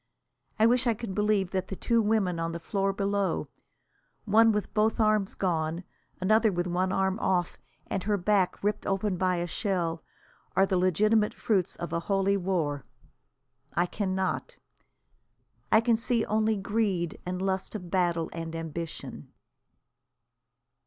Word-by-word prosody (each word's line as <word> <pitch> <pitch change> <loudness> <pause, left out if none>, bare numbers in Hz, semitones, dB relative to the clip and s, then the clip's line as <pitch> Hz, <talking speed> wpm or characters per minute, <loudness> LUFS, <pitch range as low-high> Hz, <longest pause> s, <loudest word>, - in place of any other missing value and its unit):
I 220 - +4
wish 245 +2 +3
I 230 - +2
could 215 -3 -6
believe 210 -2 +1
that 190 -1 -2
the 195 - -5
two 235 +4 +2
women 205 -5 +1
on 165 0 -2
the 170 - -4
floor 195 +3 -1
below, 200 0 -1 0.8
one 225 +2 +5
with 210 -1 -2
both 215 +1 +2
arms 215 -2 +2
gone, 165 -2 -1 0.4
another 215 +3 +3
with 175 -1 -1
one 180 +1 0
arm 190 +2 0
off 180 -4 0 0.3
and 195 - -3
her 205 +2 0
back 195 0 +1
ripped 210 +1 -1
open 195 0 0
by 185 0 +1
a 175 0 -1
shell, 170 -3 -2 0.5
are 190 +1 +5
the 190 - 0
legitimate 210 +4 +2
fruits 195 -6 0
of 170 - -6
a 170 - +1
holy 195 +2 +1
war. 170 -8 -1 0.9
I 175 - +3
cannot. 190 - -2 1.1
I 220 - +6
can 230 0 +3
see 230 0 0
only 220 0 +1
greed 195 -4 -1
and 180 0 -4
lust 190 +2 -2
of 180 -5 -7
battle 175 -3 +1
and 165 -1 -5
ambition. 165 0 -6
195 Hz, 150 wpm, -28 LUFS, 175-215 Hz, 1.1 s, I